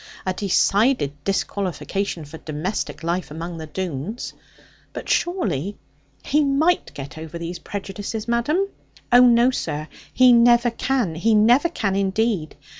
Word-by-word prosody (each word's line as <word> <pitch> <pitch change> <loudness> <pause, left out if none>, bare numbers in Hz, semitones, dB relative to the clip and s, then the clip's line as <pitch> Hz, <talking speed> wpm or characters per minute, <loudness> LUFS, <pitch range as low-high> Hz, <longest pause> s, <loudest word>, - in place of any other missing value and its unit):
A 185 - 0
decided 200 - +2
disqualification 195 -2 -2
for 155 +3 -10
domestic 155 +1 -4
life 170 +2 -2
among 165 +2 -6
the 160 - -7
Doones. 185 - -5 0.6
But, - - -7
surely, 205 - -1 0.5
he 300 +1 +3
might 295 +5 +2
get 140 +3 -8
over 160 +1 -7
those 170 +1 -5
prejudices, 205 +3 -5
madam?' 290 +12 +1 0.4
'Oh 245 +1 +8
no, 240 +1 +5
sir! 155 - -3 0.2
he 255 -1 +6
never 240 0 +5
can: 240 -6 -1
he 215 +8 +2
never 240 +10 +5
can 200 - -1
indeed. 195 -3 0
200 Hz, 130 wpm, -22 LUFS, 170-240 Hz, 0.6 s, Oh